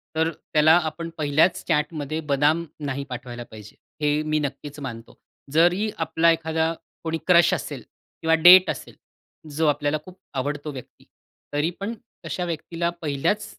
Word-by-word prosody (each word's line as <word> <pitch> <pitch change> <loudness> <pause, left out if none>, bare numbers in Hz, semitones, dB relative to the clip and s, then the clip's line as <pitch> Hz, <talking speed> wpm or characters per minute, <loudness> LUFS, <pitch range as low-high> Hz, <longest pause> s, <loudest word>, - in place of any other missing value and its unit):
तर 160 +1 +1
त्याला 155 -1 +2 0.2
आपण 165 +2 -7
पहिल्याच 155 +4 +2
चॅटमध्ये 150 -1 -1
बदाम 150 +4 +2 0.2
नाही 140 0 -3
पाठवायला 120 -1 -6
पाहिजे. 105 -1 -12 0.3
हे 150 0 +2
मी 155 0 0
नक्कीच 145 0 -5
मानतो. 120 -5 -8 0.3
जरी 175 +7 +3
आपला 160 +1 +3
एखादा 160 0 0 0.3
कोणी 165 0 -2
क्रश 175 -2 +6
असेल, - - -4 0.4
किंवा 160 0 +3
डेट 185 +1 +10
असेल, - - -5 0.6
जो 160 +1 +2
आपल्याला 145 +1 +1
खूप 185 0 -13 0.2
आवडतो 145 +2 -3
व्यक्ती. 130 -3 -12 0.5
तरी 145 +3 +1
पण 200 +3 -3 0.3
अशा 180 - -3
व्यक्तीला 170 0 -2
पहिल्याच 160 +8 0
155 Hz, 140 wpm, -24 LUFS, 145-165 Hz, 0.6 s, डेट